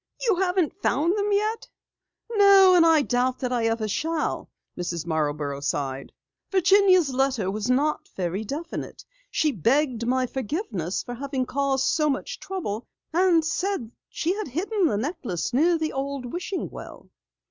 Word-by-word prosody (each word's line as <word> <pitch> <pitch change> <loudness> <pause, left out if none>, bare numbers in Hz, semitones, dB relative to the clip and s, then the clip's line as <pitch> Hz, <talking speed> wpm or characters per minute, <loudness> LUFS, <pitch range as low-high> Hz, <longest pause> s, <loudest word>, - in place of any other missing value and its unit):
"You 455 -7 +2
haven't 360 -4 0
found 320 +9 +1
them 415 0 0
yet?" 425 +3 0 0.6
"No, 395 -3 +7
and 350 -2 +6
I 325 -3 +5
doubt 250 0 0
that 250 -1 -3
I 235 -2 +1
ever 225 -1 -1
shall," 315 +9 -2 0.3
Mrs. 170 -2 -4
Marborough 150 -3 -1
sighed. 140 -1 -3 0.4
"Virginia's 375 -5 +4
letter 255 -7 0
was 215 +3 -3
not 290 +4 +1
very 185 +3 -2
definite. 305 +9 -6 0.2
She 310 - +1
begged 240 - +1
my 255 +1 +2
forgiveness 230 - -3
for 245 - -6
having 265 +1 -3
caused 275 0 0
so 305 -1 +2
much 485 - -3
trouble, 255 - -5 0.3
and 345 -2 +3
said 335 - -2
that - - -33 0.2
she 340 +3 -1
had 420 0 -4
hidden 370 - 0
the 210 - 0
necklace 240 - -3
near 330 +6 +3
the 315 -1 -2
old 275 -1 -3
wishing 355 +8 -4
well." - - -11
275 Hz, 155 wpm, -25 LUFS, 225-360 Hz, 0.6 s, No